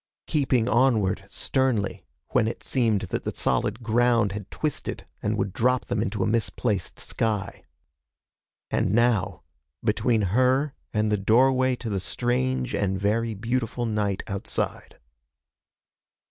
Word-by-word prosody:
Keeping 130 -6 +1
onward 110 -6 +2
sternly 120 - -1 0.2
when 120 -3 +2
it 115 - -5
seemed 115 -6 +1
that - - -1
the - - -4
solid 120 - 0
ground 115 -2 +3
had 100 -1 -6
twisted 155 -3 -3 0.2
and 105 +1 0
would 95 -2 -1
drop 125 +1 +1
them 120 -3 -1
into 105 -2 -1
a - - +1
misplaced 110 -3 -1
sky. 105 -3 -2 1.1
And - - +1
now, 120 -4 +2 0.4
between 110 0 +2
her 130 +4 +3 0.2
and 105 0 +1
the 105 - +3
doorway 130 +5 +3
to 120 -2 -6
the 100 - 0
strange 125 +5 -1
and 95 -1 0
very 110 +3 0
beautiful 120 +2 -2
night 105 -3 -1
outside. 100 -1 -4
115 Hz, 130 wpm, -25 LUFS, 105-125 Hz, 1.1 s, ground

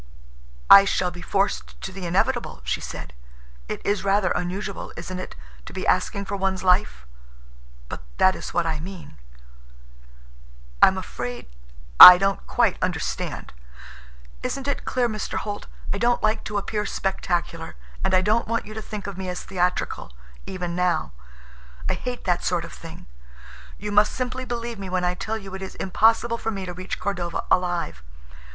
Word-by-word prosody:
"I 200 - +11
shall 185 -2 0
be 175 0 -10
forced 195 +2 -1
to 190 - -5
the 185 -2 -6
inevitable," 180 +3 0
she - - -2
said. - - -7 0.5
"It - - -6
is 205 -1 0
rather 195 -1 +2
unusual, 190 +3 -3
isn't 180 +2 -6
it, - - -7 0.3
to - - -9
be - - -4
asking 200 0 +1
for 200 - -3
one's 190 -1 -1
life? 180 - +2 0.8
But - - -7 0.2
that 185 - +5
is - - -7
what 175 - 0
I 160 -2 -1
mean." 165 - -9 1.6
"I'm 190 - +6
afraid—I - - +6
don't 195 0 -1
quite - - +1
understand." - - -3 0.9
"Isn't 275 0 -4
it 280 - -2
clear, 250 -2 +1
Mr. 215 -2 -4
Holt? 205 -1 -5 0.3
I 200 - -3
don't 240 +2 +2
like 215 +1 +1
to 210 - -3
appear 210 +1 -2
spectacular, 175 -3 -2 0.3
and 190 0 +2
I 185 - +4
don't 215 +4 +1
want 230 +1 -1
you 215 - -9
to 220 - -5
think 210 -2 -7
of 195 -2 -6
me 185 -1 -4
as 180 - -5
theatrical—even 175 - -3
now. 180 - 0 0.8
I - - +1
hate 250 -1 -5
that 180 -2 0
sort 175 -2 0
of - - -11
thing. 165 -1 -11 0.7
You 210 +1 -5
must 210 +1 +4
simply 255 0 -3
believe 235 -2 -4
me 195 -1 -6
when 180 0 -1
I 180 - +1
tell 205 +4 -3
you 195 -3 -10
it 190 - -6
is 190 - -7
impossible 225 +4 +2
for - - -2
me 195 -3 -4
to 180 - -6
reach 185 +1 -5
Cordova 175 -4 -2
alive. 175 - 0
190 Hz, 165 wpm, -24 LUFS, 175-210 Hz, 1.6 s, I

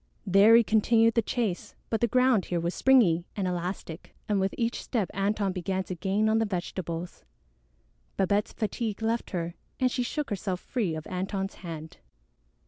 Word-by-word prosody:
There 200 +4 +6
he 235 - +7
continued 225 +1 +3
the 230 - +3
chase, 220 -5 -2 0.2
but 225 - 0
the 235 - +4
ground 250 -4 +3
here 175 - -1
was 170 +2 -2
springy 190 -11 +4
and 195 -3 -1
elastic, 175 -1 -5
and 205 -2 +1
with 190 0 0
each 235 0 -1
step 215 -7 -2
Antone 200 0 0
began 190 +1 -2
to 185 - -5
gain 195 +5 0
on 220 +1 +3
the 225 - +2
vegetables. 175 -3 -4 0.9
Babette's 200 +2 +1
fatigue 220 -1 -3
left 230 +1 -1
her, 170 -2 -3 0.3
and 255 -1 +2
she 250 - -1
shook 280 +2 -3
herself 190 -2 -2
free 205 -10 -2
of 155 - -6
Antone's 195 +1 -3
hand. 160 -3 -7
200 Hz, 170 wpm, -28 LUFS, 180-225 Hz, 0.9 s, he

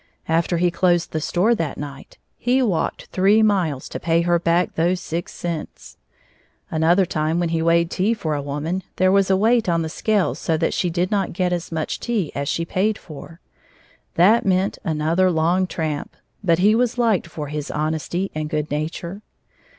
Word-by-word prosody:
After 165 +1 +1
he 175 +1 +2
closed 175 -1 +1
the 155 - -2
store 185 +9 +2
that 165 -9 -2
night, 140 -2 -9 0.2
he 255 +2 +2
walked 190 -9 -1
three 200 +4 +4
miles 180 -10 +1
to - - -5
pay 165 0 +2
her 170 0 +2
back 170 +1 +1
those 175 +3 +1
six 170 0 -4
cents. 170 -3 -6 0.8
Another 165 +4 +3
time 160 -1 -1
when 175 -1 0
he 165 0 0
weighed 170 +1 +2
tea 205 +5 +1
for 160 -8 -3
a 145 - -1
woman, 150 +6 -3
there 185 0 +3
was 195 0 +3
a 190 - +4
weight 225 0 +2
on 165 -1 +1
the 160 - -3
scales 205 +3 0
so 160 - 0
that 165 - 0
she 180 - 0
did 175 +2 -1
not 200 -2 0
get 180 0 0
as 175 -1 -4
much 160 -1 -3
tea 220 -10 -1
as 140 0 -3
she 165 - -1
paid 200 +5 0
for. 160 +2 -12 0.7
That 205 +7 +5
meant 190 0 +1
another 165 +2 +1
long 175 +3 +1
tramp. 155 -4 -4 0.3
But 170 -4 +3
he 200 +4 +4
was 245 +1 +1
liked 225 -8 +2
for 150 -3 -6
his 150 -1 -4
honesty 160 +5 -2
and 155 0 -3
good 150 -2 -2
nature. 170 +6 -4
170 Hz, 190 wpm, -21 LUFS, 160-190 Hz, 0.8 s, That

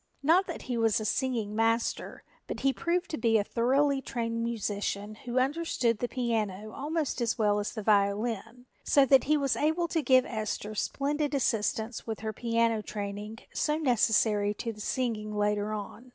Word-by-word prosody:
Not 345 +6 +4
that - - -6
he 245 -2 -2
was 225 -1 +3
a 215 - -4
singing 225 -3 -1
master, 225 +1 0 0.2
but - - -5
he 270 0 +3
proved 345 +4 -1
to 310 - -3
be 225 -1 +3
a 205 - +2
thoroughly 270 +5 +2
trained 230 -2 -3
musician 205 -2 -2
who 240 +3 -6
understood 260 -5 +1
the 245 - -1
piano 215 -5 -2
almost 300 -1 -2
as 235 -1 0
well 210 -2 +2
as 205 +1 -3
the 215 - -5
violin, 220 +3 0 0.2
so 280 -2 +5
that 270 -1 +5
he 305 +1 +3
was 275 -2 +1
able 320 +3 +1
to 325 - 0
give 255 -2 +4
Esther 215 -2 -4
splendid 290 +6 -1
assistance 225 -3 -1
with 220 -2 -4
her 220 0 -3
piano 230 -1 +1
training 205 +1 -5 0.2
so 300 0 0
necessary 220 -6 +2
to 230 +1 -4
the 210 - -11
singing 215 -3 -2
later 210 0 0
on. 215 +4 -6
230 Hz, 175 wpm, -29 LUFS, 215-265 Hz, 0.2 s, so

